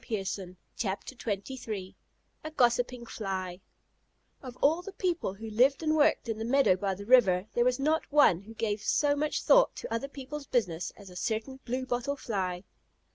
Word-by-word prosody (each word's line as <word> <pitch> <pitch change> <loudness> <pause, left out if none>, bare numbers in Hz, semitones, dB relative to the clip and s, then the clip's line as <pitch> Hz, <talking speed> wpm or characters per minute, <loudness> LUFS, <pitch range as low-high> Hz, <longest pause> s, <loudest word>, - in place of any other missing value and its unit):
A - - -26
GOSSIPING 195 -4 -4 2.5
FLY 190 -5 -4 0.9
Of 255 -2 -9
all 320 +5 +3
the 400 - -8
people 350 - -1
who 220 +2 -7
lived 265 +7 +3
and 310 0 +2
worked 300 -5 +3
in 225 -1 -3
the - - -2
meadow 255 -4 +4
by 195 0 -2
the 200 +2 -9
river, 200 -7 +5
there 240 - +3
was 250 0 +2
not 305 +4 0
one 285 - +5
who 220 +3 -13
gave 215 -2 -1
so 285 +6 +2
much 300 +1 -1
thought - - +5
to - - -6
other 230 +4 -2
people's 280 +1 -8
business 180 -9 -1
as 195 -3 -12
a - - -13
certain 225 +8 -3
Blue 255 +2 -2
bottle 250 +3 -1
Fly. 185 -8 -3
235 Hz, 165 wpm, -29 LUFS, 195-280 Hz, 2.5 s, river